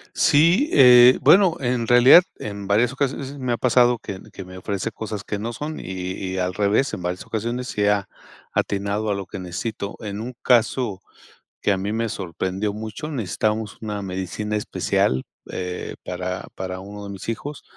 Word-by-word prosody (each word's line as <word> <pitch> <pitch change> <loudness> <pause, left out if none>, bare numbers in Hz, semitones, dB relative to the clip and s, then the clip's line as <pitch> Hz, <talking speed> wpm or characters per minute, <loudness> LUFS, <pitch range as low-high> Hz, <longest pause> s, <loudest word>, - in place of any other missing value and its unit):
Sí, 170 - +4
eh, 125 -1 +8
bueno, 185 -3 +6
en 120 -3 -1
realidad, 125 +8 +8 0.2
en 100 -2 -6
varias 115 +5 +3
ocasiones 135 0 -2
s 145 - -9
me 125 -2 -1
ha - - -1
pasado 125 -1 +3
que 95 -1 -7
ne - - -16
que 95 - -8
me 95 0 -11
ofrece 95 0 -3
cosas 105 -2 -6
que 105 - -4
no 115 +2 -4
son 155 +4 -5
y - - -8 0.5
y - - -3
al 90 0 -1
revés, 105 +7 +1
en 90 - -4
varias 90 +1 -3
ocasiones 120 +3 -3
sí 105 -1 -1
ha, 105 -1 +2 0.5
atinado 100 +1 -1
a - - +2
lo 100 - -5
que 95 - -7
necesito. 100 +3 -5
En 100 -1 -5
un 125 +2 -6
caso 115 -4 +2 0.6
que 105 - +2
a 95 - +2
mí 100 +2 -3
me 115 0 -1
sorprendió 95 +3 -3
mucho, 110 +8 -6
necesitábamos 110 - -2
una 105 -2 -4
medicina 95 +3 -4
especial, 65 -9 0 0.3
eh, 90 0 -5
para 90 0 -4
para 95 0 -5
uno 100 +1 -9
de - - -7
mis 100 +3 -7
hijos 145 +6 -5
105 Hz, 185 wpm, -23 LUFS, 95-125 Hz, 0.6 s, eh